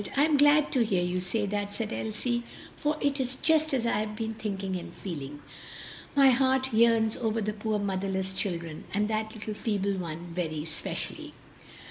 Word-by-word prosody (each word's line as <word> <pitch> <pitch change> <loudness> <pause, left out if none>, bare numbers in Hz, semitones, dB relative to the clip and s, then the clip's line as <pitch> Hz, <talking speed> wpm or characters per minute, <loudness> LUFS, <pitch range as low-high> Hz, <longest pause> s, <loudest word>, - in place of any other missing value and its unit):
I 285 - +6
am 310 -1 +3
glad 290 +1 +5
to 250 - +3
hear 190 -5 +1
you 180 +1 0
say 195 +4 -1
that!" 205 0 -2
said 225 +1 -3
Elsie, 240 +2 -1 0.3
"for 300 +1 0
it 285 0 +1
is 260 0 -1
just 315 +2 +3
as 255 -4 +1
I 220 -3 +2
have 215 0 -3
been 225 0 -3
thinking 195 -3 -3
and 180 - -5
feeling. 145 -5 -6 0.7
My 275 -2 +7
heart 260 0 +2
yearns 225 -1 +4
over 225 -1 0
the 215 0 -1
poor 215 0 -1
motherless 190 -1 -1
children, 170 -5 -3
and 210 +1 +2
that 220 0 -2
little 215 0 -5
feeble 200 -2 0
one 170 -1 -5
very 160 -3 -2
especially." 160 0 -5
215 Hz, 180 wpm, -29 LUFS, 190-240 Hz, 0.7 s, My